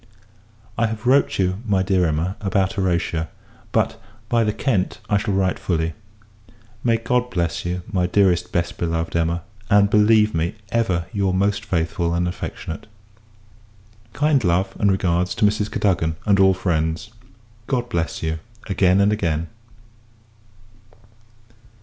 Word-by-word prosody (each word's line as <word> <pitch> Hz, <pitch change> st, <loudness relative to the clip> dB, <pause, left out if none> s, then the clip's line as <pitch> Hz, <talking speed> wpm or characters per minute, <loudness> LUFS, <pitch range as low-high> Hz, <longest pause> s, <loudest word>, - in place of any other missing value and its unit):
I 115 Hz, -, +3 dB
have 110 Hz, +1 st, -6 dB
wrote 135 Hz, +3 st, +3 dB
you, 95 Hz, +1 st, 0 dB
my 100 Hz, -5 st, +1 dB
dear 95 Hz, -2 st, +2 dB
Emma, 80 Hz, +5 st, -1 dB
about 95 Hz, 0 st, +1 dB
Horatia; 85 Hz, -5 st, -1 dB, 0.4 s
but, -, -, 0 dB, 0.3 s
by 115 Hz, -1 st, +3 dB
the 105 Hz, -, +1 dB
Kent, 105 Hz, -4 st, -1 dB
I 100 Hz, -, +5 dB
shall 100 Hz, -1 st, -1 dB
write 95 Hz, -1 st, +1 dB
fully. 80 Hz, -2 st, -1 dB, 0.9 s
May 115 Hz, -2 st, +3 dB
God 125 Hz, +2 st, 0 dB
bless 85 Hz, -7 st, -2 dB
you, 90 Hz, 0 st, -3 dB
my 90 Hz, -2 st, +2 dB
dearest 90 Hz, -2 st, +2 dB
best 85 Hz, 0 st, -2 dB
beloved 85 Hz, -1 st, -2 dB
Emma! 85 Hz, 0 st, 0 dB, 0.3 s
and 100 Hz, 0 st, +4 dB
believe 105 Hz, 0 st, +4 dB
me, 80 Hz, +3 st, -1 dB, 0.2 s
ever, 95 Hz, -8 st, +1 dB
your 95 Hz, -2 st, +1 dB
most 100 Hz, +2 st, +1 dB
faithful 85 Hz, -1 st, -1 dB
and 90 Hz, 0 st, 0 dB
affectionate 90 Hz, 0 st, -6 dB, 1.3 s
Kind 145 Hz, -2 st, +2 dB
love, 90 Hz, +1 st, +1 dB
and 100 Hz, -, +3 dB
regards, 90 Hz, -1 st, 0 dB
to -, -, +2 dB
Mrs. 105 Hz, 0 st, +1 dB
Cadogan, 85 Hz, -7 st, 0 dB
and 100 Hz, -2 st, +3 dB
all 95 Hz, -1 st, +5 dB
friends. 85 Hz, +3 st, -1 dB, 0.6 s
God 125 Hz, -2 st, -1 dB
bless 85 Hz, -10 st, -2 dB
you, 80 Hz, 0 st, -1 dB, 0.3 s
again 95 Hz, -1 st, +3 dB
and 100 Hz, +1 st, +3 dB
again! 85 Hz, -5 st, -1 dB
95 Hz, 140 wpm, -22 LUFS, 85-105 Hz, 1.3 s, I